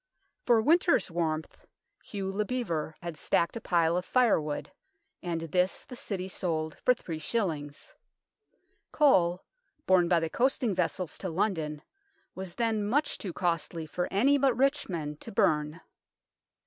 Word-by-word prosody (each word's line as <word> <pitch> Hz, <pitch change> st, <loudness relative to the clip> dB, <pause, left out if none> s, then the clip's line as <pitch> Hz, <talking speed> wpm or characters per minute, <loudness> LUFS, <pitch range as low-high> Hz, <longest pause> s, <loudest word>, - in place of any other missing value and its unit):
For 235 Hz, -2 st, +6 dB
winter's 330 Hz, -, +3 dB
warmth 160 Hz, -2 st, -3 dB, 0.4 s
Hugh 195 Hz, -2 st, -4 dB
le 205 Hz, +2 st, 0 dB
Bevere 170 Hz, -10 st, -3 dB
had 170 Hz, -2 st, -5 dB
stacked 170 Hz, +4 st, 0 dB
a 230 Hz, -, -5 dB
pile 170 Hz, -5 st, +2 dB
of 180 Hz, -, 0 dB
firewood, 180 Hz, -, +1 dB, 0.5 s
and 170 Hz, -2 st, -3 dB
this 180 Hz, +3 st, 0 dB
the 250 Hz, -, -9 dB
City 190 Hz, -5 st, -4 dB
sold 160 Hz, -4 st, -2 dB
for 250 Hz, -, +5 dB
three 165 Hz, -8 st, -6 dB
shillings. 155 Hz, -7 st, -3 dB, 1.0 s
Coal, 180 Hz, -, +3 dB, 0.4 s
borne 185 Hz, -2 st, +4 dB
by 175 Hz, -1 st, +4 dB
the 165 Hz, -, -1 dB
coasting 245 Hz, +3 st, +1 dB
vessels 180 Hz, -1 st, -2 dB
to 190 Hz, -, -3 dB
London, 160 Hz, -4 st, -1 dB, 0.5 s
was 190 Hz, -2 st, -7 dB
then 225 Hz, -3 st, 0 dB
much 265 Hz, +9 st, 0 dB
too 190 Hz, -, -4 dB
costly 165 Hz, -1 st, -2 dB
for 175 Hz, +3 st, -3 dB
any 275 Hz, +9 st, +4 dB
but 265 Hz, -3 st, +2 dB
rich 275 Hz, +1 st, +1 dB
men 150 Hz, -4 st, -4 dB
to -, -, -9 dB
burn. 150 Hz, -2 st, +1 dB
180 Hz, 145 wpm, -29 LUFS, 165-225 Hz, 1.0 s, For